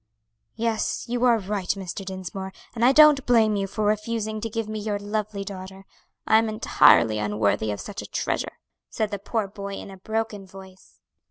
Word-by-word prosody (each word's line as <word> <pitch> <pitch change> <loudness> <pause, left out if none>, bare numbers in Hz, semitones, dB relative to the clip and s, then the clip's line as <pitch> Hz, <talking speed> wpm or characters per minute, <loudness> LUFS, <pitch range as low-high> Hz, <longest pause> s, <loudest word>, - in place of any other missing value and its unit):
"Yes, 225 -1 -1
you 240 +1 -1
are 240 -2 +5
right, 200 -2 -3
Mr. 195 0 -3
Dinsmore, 190 0 -6 0.2
and 230 0 -2
I 250 - +7
don't 300 -1 +7
blame 225 -3 +4
you 195 -1 -1
for 210 +2 -2
refusing 215 0 -1
to 225 - -3
give 225 0 -3
me 215 0 -4
your 210 -1 -2
lovely 205 0 -3
daughter; 190 0 -9 0.4
I'm 220 0 +4
entirely 115 - +4
unworthy 105 0 0
of 105 - -3
such - - -6
a - - -9
treasure," - - -2 0.3
said 215 -1 -2
the 205 - -3
poor 215 +1 -2
boy 200 0 -7
in 195 - -8
a 190 - -11
broken 220 0 -3
voice. 190 -1 -15
205 Hz, 180 wpm, -25 LUFS, 190-220 Hz, 0.4 s, I